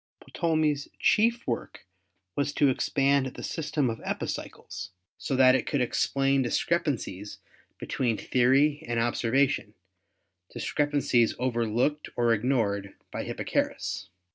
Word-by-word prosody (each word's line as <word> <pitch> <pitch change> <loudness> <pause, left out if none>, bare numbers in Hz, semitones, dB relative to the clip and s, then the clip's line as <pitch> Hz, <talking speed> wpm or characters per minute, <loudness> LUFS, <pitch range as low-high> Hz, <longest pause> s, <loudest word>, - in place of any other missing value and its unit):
Ptolemy's 155 -4 +1
chief 235 +2 +2
work 120 -5 -4 0.5
was 145 0 0
to 145 - +4
expand 140 +1 +2
the 130 - -8
system 150 -3 -1
of 115 -1 -3
epicycles - - -5 0.3
so 135 - -2
that 130 0 +6
it 130 - 0
could 145 - 0
explain 135 +2 +1
discrepan 150 +4 +1
cies 100 -2 -8 0.4
between 120 -5 -1
theory 135 +4 +2
and 120 -1 0
observation, 120 -1 +1 0.8
discrepancies 145 -5 +1
over 120 -2 0
looked 145 +7 0
or 120 -1 +3
ignored 105 -4 0 0.2
by - - -4
Hipparchus. - - -2
130 Hz, 115 wpm, -27 LUFS, 120-145 Hz, 0.8 s, that